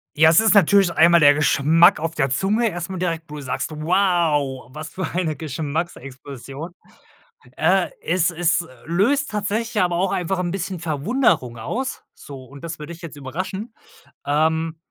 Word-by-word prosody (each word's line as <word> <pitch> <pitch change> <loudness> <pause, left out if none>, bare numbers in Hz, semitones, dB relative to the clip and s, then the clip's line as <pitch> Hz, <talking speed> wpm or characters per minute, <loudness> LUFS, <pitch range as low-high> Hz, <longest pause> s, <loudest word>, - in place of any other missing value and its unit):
Ja, 155 +1 +6
es 165 - +6
ist 220 -1 +4
natürlich 195 -1 +5
einmal 170 +1 +5
der 145 -2 +6
Geschmack 150 +3 +4
auf 165 +1 -3
der 135 -2 +1
Zunge 210 - +1
erst 175 -1 -6
mal 190 - -5
direkt, 165 -2 -2
wo 150 - -8
du 150 - -7
sagst: 130 -1 -3
„Wow, 155 -5 0
was 155 0 -7
für 190 - -4
eine 170 -3 -1
Geschmacksexplosion.“ 140 -1 -6 0.8
Äh, 180 +3 +2
es 175 +1 +1
es, 170 0 +1
äh, 170 - -7 0.2
löst 230 - +1
tatsächlich 210 +2 -2
aber 175 -1 0
auch 190 +2 0
einfach 180 +1 -1
'n 175 - -2
bisschen 185 0 -4
Verwunderung 155 - 0
aus, 255 - -4
so, 135 -2 -11
und 140 +2 -14
das 165 0 -6
wird 150 +2 -9
dich 170 - -9
jetzt 165 -3 -9
überraschen. 185 - -6 0.5
Ähm, 160 +2 0
165 Hz, 170 wpm, -21 LUFS, 150-185 Hz, 0.8 s, Ja